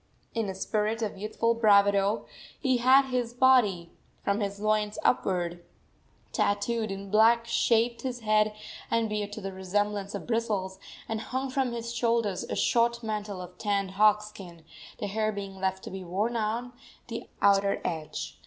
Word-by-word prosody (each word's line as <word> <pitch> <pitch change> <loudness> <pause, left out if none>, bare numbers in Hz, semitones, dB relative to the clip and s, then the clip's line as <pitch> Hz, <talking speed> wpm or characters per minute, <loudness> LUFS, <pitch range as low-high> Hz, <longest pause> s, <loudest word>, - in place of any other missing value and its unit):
In 225 -3 -1
a 190 - -4
spirit 215 +3 -1
of 210 - -3
youthful 215 +3 0
bravado 200 -2 +3 0.3
he 260 -3 +2
had 260 +2 +5
his 245 -1 -1
body, 235 -10 +4 0.3
from 200 +1 +1
his 200 -1 -3
loins 215 0 0
upward, 175 -6 0 0.7
tattooed 215 +2 0
in 195 0 -6
black, 230 +2 +5
shaved 235 0 +2
his 250 -2 -4
head 215 -1 +2 0.3
and 230 -1 +1
beard 210 -1 -2
to 215 - -6
the 195 0 -5
resemblance 200 +2 -2
of - - -6
bristles, 210 -5 -1 0.3
and 220 -1 -3
hung 260 +2 -3
from 260 -2 0
his 235 0 -4
shoulders 230 -5 0
a - - -4
short 235 0 +2
mantle 210 -3 -4
of 180 0 -13
tanned 200 -2 0
hog 210 +2 +4
skin, 180 -6 -11 0.3
the - - -4
hair 215 +2 0
being 195 -2 -6
left 190 0 -1
to - - -7
be 190 0 -6
worn 200 +7 -1
on 230 +3 -2 0.3
the - - -6
outer 200 0 +3
side. 160 -3 -4
210 Hz, 160 wpm, -28 LUFS, 195-230 Hz, 0.7 s, had